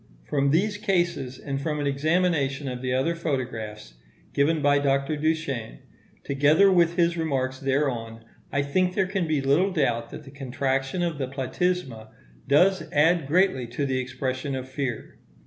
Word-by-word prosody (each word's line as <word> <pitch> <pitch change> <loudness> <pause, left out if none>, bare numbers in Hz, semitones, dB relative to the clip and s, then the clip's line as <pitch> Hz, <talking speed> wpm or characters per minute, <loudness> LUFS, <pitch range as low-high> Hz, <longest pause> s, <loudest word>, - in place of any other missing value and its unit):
From 140 - 0
these 205 +7 +1
cases, 175 - 0
and 135 -1 -4
from 150 0 -2
an 145 - -1
examination 145 -1 +1
of 125 -1 -4
the 130 -1 -2
other 130 +6 +1
photographs 115 - -4 0.4
given 155 +3 +2
by 145 -1 +3
Dr. 140 +1 +1
Duchenne, 145 - -2 0.5
together 150 +8 +4
with 170 -2 +3
his 170 0 +2
remarks 130 -5 -1
thereon, 125 -5 -2 0.3
I 140 - +1
think 180 +6 0
there 190 - +2
can 185 -2 -2
be 155 -3 +1
little 145 +8 +3
doubt 115 -8 0
that - - -9
the 135 - -13
contraction 135 +3 -2
of 165 -4 -2
the 135 - -1
platysma 135 -2 -2 0.4
does 180 +4 +3
add 160 +1 +3
greatly 160 -6 +2
to 125 +5 -3
the 130 -1 0
expression 130 +2 -3
of 130 0 -5
fear. 130 -3 -5
140 Hz, 160 wpm, -25 LUFS, 130-165 Hz, 0.5 s, together